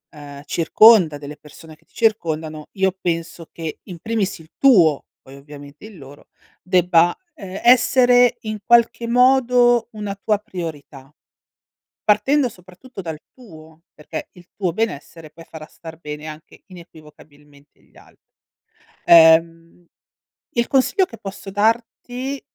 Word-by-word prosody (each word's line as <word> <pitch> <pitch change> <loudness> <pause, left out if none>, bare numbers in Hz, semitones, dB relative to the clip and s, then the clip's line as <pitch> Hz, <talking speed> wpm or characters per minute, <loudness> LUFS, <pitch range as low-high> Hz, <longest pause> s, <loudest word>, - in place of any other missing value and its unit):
uhm, 145 -1 -11
circonda, 175 -1 +4
delle 145 +1 -10
persone 155 +1 -16
che 165 +1 -34
ti - - -37
circondano, 160 -8 -2
io 190 -1 0
penso 165 -1 -5
che 160 -2 -7
in 175 -4 -11
primis 210 -3 -3
il 160 0 -17
tuo, 175 - +4 0.2
poi 135 +1 -15
ovviamente 145 +3 -14
il 215 -4 -13
loro, 140 +1 -15 0.3
debba, 175 -2 +2 0.2
ehm, 195 -7 -9
essere 245 0 +4
in 215 -2 -6
qualche 235 0 +3
modo, 245 -1 +3
una 210 -2 -6
tua 205 +1 -1
priorità. 150 -8 -9 0.9
Partendo 250 +6 +1
soprattutto 190 +5 -14
dal 160 -4 -7
tuo, 160 -8 -17
perché 150 - -8
il 180 -1 -18
tuo 180 -4 -3
benessere 165 -6 -5
poi 165 +1 -15
farà 160 -1 -11
star 160 0 -13
bene 150 -1 -9
anche 155 0 -12
inequivocabilmente 150 -5 -18
gli - - -30
al - - -20 0.9
Uhm, 165 +1 +4 0.7
il 235 0 0
consiglio 325 +9 +1
che 230 - -14
posso 195 0 -9
darti, 240 +5 -2
175 Hz, 130 wpm, -19 LUFS, 155-225 Hz, 0.9 s, circonda